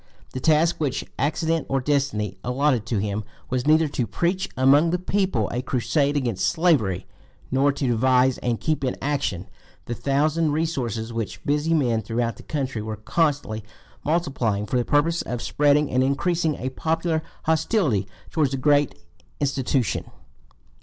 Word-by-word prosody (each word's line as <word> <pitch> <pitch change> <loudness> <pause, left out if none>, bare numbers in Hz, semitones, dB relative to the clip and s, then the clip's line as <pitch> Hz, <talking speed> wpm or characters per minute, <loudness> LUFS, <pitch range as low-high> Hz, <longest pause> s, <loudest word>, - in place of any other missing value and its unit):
The 130 - -3
task 160 +4 +3
which 145 -5 -1
accident 160 +2 0
or 135 - +1
destiny 130 -8 0
allotted 125 -2 +1
to 115 - 0
him 105 +1 -2 0.3
was 125 +1 -1
neither 155 +1 +5
to 125 -4 -2
preach 175 - -1
among 140 +5 +5
the 180 - +1
people 185 - 0
a 125 - -1
crusade 140 +4 0
against 115 -8 0
slavery, 145 - +2 0.5
nor 135 +2 +3
to 140 - -3
devise 130 +2 +3
and 120 -2 -1
keep 155 -3 -1
in 130 - 0
action 135 -11 -2 0.4
the 120 - -3
thousand 150 +5 +1
resources 120 -8 -2
which 115 -2 -4
busy 150 +3 +1
men 120 -7 +1
throughout 115 -1 -2
the - - -11
country 135 -7 -3
were 110 0 -5
constantly 135 -3 0 0.4
multiplying 135 -10 0
for 125 - -1
the 120 - +1
purpose 160 +6 +2
of 120 - -4
spreading 145 +3 +2
and 130 +1 +3
increasing 155 +4 +1
a 130 - -3
popular 160 +3 -1 0.2
hostility 160 - +1 0.2
towards 155 -4 +2
the 135 - -2
great 145 - +3 0.4
"institution." 135 -4 0
135 Hz, 155 wpm, -24 LUFS, 120-155 Hz, 0.5 s, neither